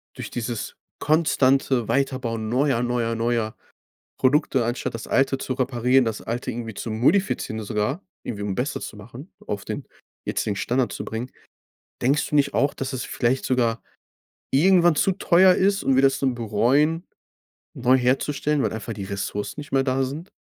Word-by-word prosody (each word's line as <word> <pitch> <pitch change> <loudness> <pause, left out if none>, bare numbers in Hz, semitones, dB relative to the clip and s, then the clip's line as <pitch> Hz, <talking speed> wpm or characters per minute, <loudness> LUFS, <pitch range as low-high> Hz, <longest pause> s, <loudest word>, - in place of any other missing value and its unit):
durch - - -7
dieses 120 -1 -4 0.2
konstante 135 -5 +2
Weiterbauen 125 -5 -1
neuer, 130 0 +2
neuer, 120 -1 0
neuer 115 -1 -1 0.6
Produkte 135 -1 +2
anstatt 120 +1 -2
das 115 - -6
Alte 135 0 +2
zu 130 - -3
reparieren, 125 0 +2
das 110 -2 -3
Alte 120 +2 -3
irgendwie 115 -2 -6
zu 115 - -5
modifizieren 125 - +1
sogar, 105 - -2 0.2
irgendwie 105 -3 -5
um 100 -1 -2
besser 135 +6 -2
zu - - -7
machen, 120 - -11 0.2
auf 100 -1 -4
den - - -5 0.4
jetzigen 105 - -1
Standard 125 +5 0
zu - - -5
bringen, 115 +3 -5 0.7
denkst 140 +4 +2
du - - -4
nicht 140 -1 +2
auch, 140 - +2
dass 135 - -4
es 130 -1 -3
vielleicht 130 +2 0
sogar 120 -3 +1 0.7
irgendwann 175 +3 +5
zu 195 - +3
teuer 185 0 +5
ist 195 +2 +2
und 135 - +3
wir 135 - +4
das 135 0 +3
dann 130 -2 +1
bereuen 125 - +1 0.7
neu 130 -2 +3
herzustellen, 135 +3 +1
weil - - 0
einfach 110 +1 -5
die 100 -3 -6
Ressourcen 100 +6 -4
nicht 145 - -11
mehr 135 0 +3
da 130 0 +1
sind? 150 +8 -6
130 Hz, 165 wpm, -24 LUFS, 115-140 Hz, 0.7 s, irgendwann